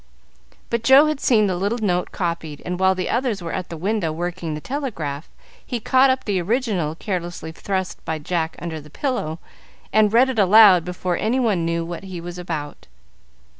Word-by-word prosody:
But 235 -1 0
Joe 270 +4 +7
had 305 -2 -1
seen 220 -6 +3
the 190 -2 0
little 200 +6 -1
note 180 -6 -1
copied, 170 -4 -4
and 180 0 -3
while 190 0 +3
the 185 -1 -2
others 240 -4 0
were 165 - -4
at 185 -2 -4
the 165 - -6
window 190 -1 -1
working 175 0 -4
the - - -5
telegraph 165 - -4 0.3
he 245 - -4
caught 260 +4 +4
up 260 0 +1
the 195 -4 0
original, 195 - -1
carelessly 175 -3 -4
thrust 190 +2 -4
by 160 - -2
Jack 160 +1 -2
under 160 -2 -5
the 150 - -15
pillow, 165 - -2 0.6
and 215 -1 +4
read 245 +4 +5
it 250 -4 -1
aloud 195 -3 +7
before 180 0 -2
any 235 +5 0
one 205 -9 +1
knew 170 0 -1
what 170 +3 -7
he 185 -2 -6
was 175 +1 -7
about. 155 -4 -6
185 Hz, 190 wpm, -22 LUFS, 170-225 Hz, 0.6 s, Joe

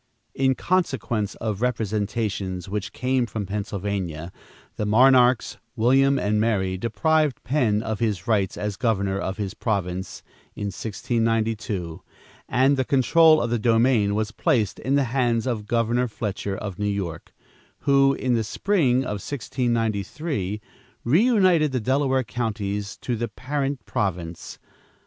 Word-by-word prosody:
In 130 -1 +2
consequence 130 - -1
of 110 -2 -4
representations 105 -5 -2
which 100 0 -4
came 125 -1 0
from 110 -3 -4
Pennsylvania, 95 -4 -4 0.4
the 105 - -2
monarchs 125 +2 +4 0.2
William 135 +4 +4
and 105 -2 +1
Mary 95 -5 +1
deprived 150 - +1
Penn 120 -6 +1
of 110 -2 -3
his 105 -7 -1
rights 100 -5 +1
as 105 -2 -3
governor 100 -4 0
of 95 0 -3
his 100 -2 -3
province, 95 -5 -3 0.3
in 100 -1 -3
1692, 110 -6 -2 0.5
and 135 +3 +3
the 130 - +2
control 155 +5 +5
of 120 -1 -1
the 120 - +1
domain 115 -2 +3
was 110 0 -1
placed 110 -1 0
in 135 +2 0
the 140 - +3
hands 120 -3 +1
of 110 -5 -3
Governor 120 +2 +1
Fletcher 105 -3 -4
of 100 -3 -6
New 105 - 0
York, 90 -5 -4 0.5
who, 135 0 +4
in 130 -2 0
the 115 -2 +1
spring 130 - +1
of 105 -5 -4
1693, 115 - -2 0.4
reunited 180 - +4
the 130 - 0
Delaware 130 +2 +1
counties 105 -4 -3
to 125 - -1
the 120 +1 -2
parent 135 -2 -3
province. 85 -4 -3
115 Hz, 135 wpm, -24 LUFS, 100-130 Hz, 0.5 s, control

